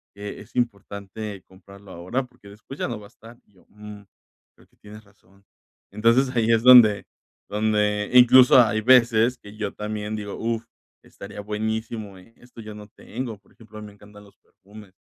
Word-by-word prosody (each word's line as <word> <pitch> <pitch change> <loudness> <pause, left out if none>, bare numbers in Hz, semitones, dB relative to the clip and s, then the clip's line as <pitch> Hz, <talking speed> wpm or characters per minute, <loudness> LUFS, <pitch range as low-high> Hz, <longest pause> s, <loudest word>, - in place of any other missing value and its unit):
que 100 0 -8
es - - -18
importante 100 -3 -5
comprarlo 100 +1 -17
ahora? 95 +11 -4
Porque 120 -5 -19
después 105 +7 -13
ya - - -2
no 120 -3 -6
va 105 - -14
a - - -23
estar". 115 +1 -17
Y 105 - -33
yo: 90 - -26
"Mm, 105 0 -12 0.5
creo - - -24
que - - -36
tienes 105 +1 -14
razón". 100 -1 -27 0.5
Entonces, 115 +5 +1
ahí 115 -1 +1
es 115 0 +2
donde 120 -5 +7 0.4
donde 105 0 -1
incluso, 125 +1 +7
hay 110 -2 0
veces 120 0 +3
que 105 0 -14
yo 105 -2 -4
también 105 0 -5
digo: 105 -1 -7
"Uf, 115 0 -4 0.4
estaría 100 +1 -11
buenísimo, 110 0 -5
¿eh?, 105 +5 -21
esto 120 -1 -15
yo 105 -1 -10
no 105 0 -12
tengo". 115 +1 -8
Por 100 - -29
ejemplo, 110 -1 -16
a - - -9
mí 105 - -10
me 105 - -15
encantan 105 0 -17
los 100 - -21
perfumes, 100 0 -18
105 Hz, 185 wpm, -23 LUFS, 100-115 Hz, 0.5 s, donde